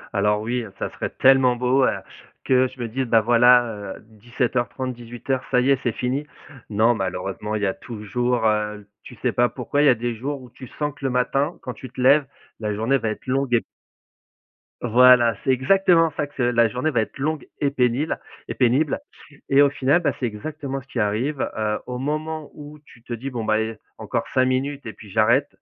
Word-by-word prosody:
Alors 105 +1 +2
oui, 120 +3 -2
heu, 100 - -10
ça - - -3
serait - - -4
tellement 130 -2 +4
beau, 125 +2 +2
heu, - - +3 0.6
que 130 0 +4
je 130 - -16
me 120 - -3
dise: 130 +4 -2
«Ben 115 -2 +4
voilà, 120 +2 +5 0.3
heu, - - -14
17:30-18:00, 120 +2 -3
ça 125 - +3
y 135 +2 +3
est, 135 - +3
c'est 120 - 0
fini. 130 +6 -3 0.4
Non 110 +3 +3
malheureusement, 95 +1 -3
il 105 - -2
y - - +3
a 95 - 0
toujours, 120 +2 -2
heu 105 -1 0 0.2
tu 125 - -12
sais 125 - +1
pas 120 +1 +2
pourquoi 135 +3 -1
il 150 - +4
y - - +7
a 125 - +5
des 120 +1 -3
jours 135 +4 -4
où 125 - -13
tu 130 - -11
sens 150 -1 -1
que 140 - -17
le 135 - +2
matin, 135 +5 0
quand 125 - -5
tu 130 +3 -10
te 125 - -13
lèves, 140 +3 +5 0.3
la 105 -1 -2
journée 115 +6 +1
va 110 - -2
être 110 - -6
longue 135 -1 -1
et 115 - +1 1.2
Voilà. 120 -1 +6
C'est 135 - +2
exactement 165 +4 +3
ça, 145 - -1
que 145 - -24
c'est 120 -2 +1
la 115 -1 +4
journée 125 +7 -1
va 120 -5 +2
être 110 - -6
longue 150 +2 -2
et 145 - +2
pénible 130 +3 0 0.3
et - - -4
pénible, 130 - +2 0.5
et 140 +1 +5
au 145 - +6
final, 140 +4 +2
ben, 145 -5 +1
c'est 130 - -1
exactement 135 +5 -5
ce 130 - -22
qui 125 - -4
arrive. 115 +8 0 0.2
Heu, 105 -1 -1
au 125 0 -5
moment 155 +2 -3
où 150 0 -11
tu 120 - -18
te 120 - -6
dis: 125 +4 -5
«Bon, 120 -4 -4
ben, 110 - +2
eh, 110 0 -2 0.2
encore - - -3
5 130 - +3
minutes 135 +2 -1
et 110 - -5
puis 105 - -14
j'arrête» 115 +6 +3
125 Hz, 220 wpm, -23 LUFS, 115-135 Hz, 1.2 s, y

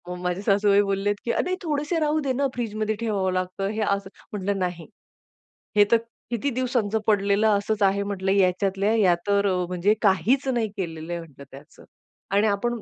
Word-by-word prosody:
मग 180 - -5
माझे 180 +1 -2
सासूबाई 200 0 +3
बोललेत, 200 +1 0
की 235 - +1
"अरे, 365 +8 0
थोडेसे 300 +1 -1
राहू 305 0 +1
दे 280 -3 -1
ना, 275 +2 +1
फ्रिजमध्ये 220 -2 -2
ठेवावं 200 -5 -1
लागतं, 185 +1 -2
हे 215 +1 -3
असं." 200 -2 -1 0.2
म्हटलं, 200 0 -1
"नाही, 180 -2 -3 0.9
हे 205 - +7
तर 230 - +7 0.3
किती 235 +4 -1
दिवसांच 245 -4 -1
पडलेलं 205 0 +3
असंच 210 +1 -1
आहे," 200 +1 +2
म्हटलं. 195 -1 -2
"याच्यातल्या 195 +2 +2
या 190 -6 +4
तर 200 0 +2
अ, - - +1
म्हणजे 180 +3 +2
काहीच 215 - +2
नाही 240 -4 0
केलेलं 165 -3 -5
आहे," 170 - -3
म्हटलं, 150 -4 -13
"त्याचं." 140 +3 -14 0.5
आणि 205 +2 +3
"आपण 230 +3 -1
200 Hz, 180 wpm, -24 LUFS, 190-225 Hz, 0.9 s, हे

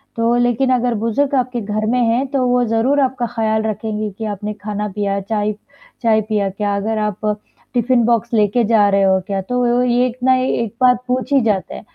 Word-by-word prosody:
तो 230 +1 +1
लेकिन 245 +2 +1
अगर 245 -1 +1
बुज़ुर्ग 230 +6 0
आपके 250 -2 -1
घर 215 +1 -2
में 250 - +1
हैं 235 +3 +1
तो 265 -2 +1
वो 245 0 +2
ज़रूर 230 +6 +1
आपका 255 -2 0
ख़्याल 220 -2 -1
रखेंगे 215 0 -3
कि 225 - -4
आपने 210 0 -4
खाना, 210 0 -4
पिया 200 0 -2
चाय 210 +1 -1 0.5
चाय 220 -2 +3
पिया 205 -2 0
क्या? 205 +1 -2
अगर 220 +2 -2
आप 210 -1 -2 0.5
टिफिन 240 0 +2
बॉक्स 235 0 0
लेके 215 +2 +2
जा 210 -2 +4
रहे 195 0 +2
हो 190 0 +3
क्या? 195 -1 -2
तो 245 +3 +1
ये 245 +1 +2
एक 245 +1 -7
ना 260 0 +5
एक 235 -4 -1
बात 250 -1 +4
पूछी 255 +2 +1
जाता 205 -4 -1
है। - - -8
225 Hz, 200 wpm, -18 LUFS, 210-245 Hz, 0.5 s, ना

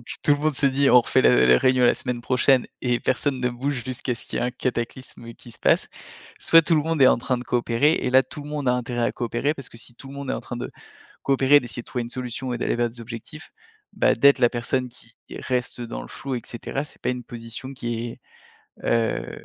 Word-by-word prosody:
donc, 120 - -20 0.2
tout - - +1
le 145 - +2
monde 155 0 0
se 140 - +1
dit: 140 +1 +3
«On 125 0 +7
refait - - +2
la 60 0 +5
la 60 0 +6
réunion 130 -1 +3
la - - +6
semaine 125 -2 -4
prochaine» 130 +1 +3
et 125 -2 +1
personne 130 +1 -1
ne 125 0 +1
bouge 125 +1 -3
jusqu'à 130 -1 -3
ce 115 - -11
qu'il - - -5
y - - 0
ait - - +1
un - - -1
cataclysme 120 -1 -5
qui 120 - -14
se 115 - -13
passe, - - +2 0.5
soit 165 0 +6
tout 165 - +2
le 150 - +3
monde 160 -2 +1
est 130 - +9
en - - +5
train 125 +1 0
de 125 - -6
coopérer 120 +5 +2
et 145 - -1
là, 130 +1 +5
tout 145 - -8
le 145 - -10
monde 145 -3 -2
a - - +4
intérêt 120 -1 -2
à - - 0
coopérer, 120 +4 -1
parce 135 -4 -9
que - - -14
si 120 +1 -9
tout 135 - -12
le 135 - -10
monde 140 -1 -5
est - - 0
en - - -3
train 120 - -7
de 120 - -5 0.5
coopérer, 135 +1 +4
d'essayer 120 0 -7
de - - -39
trouver 125 - -3
une 120 - -8
solution 125 0 -4
et - - -2
d'aller - - -1
vers 120 0 0
des 120 +1 -13
objectifs, 115 -1 -9 0.4
bah, - - +3
d'être 140 +3 +5
la 120 -2 +5
personne 125 +1 -2
qui 120 -1 -14 0.3
reste 125 -1 -2
dans 120 -1 -5
le - - -11
flou 135 -2 -5
et 120 - -4
cetera, 130 +4 -4
c'est 150 - -13
pas - - -1
une 125 -1 -5
position 115 +2 -8
qui 120 -2 -5 0.6
est, - - -16
heu, 115 -1 -1
125 Hz, 260 wpm, -24 LUFS, 120-135 Hz, 0.6 s, est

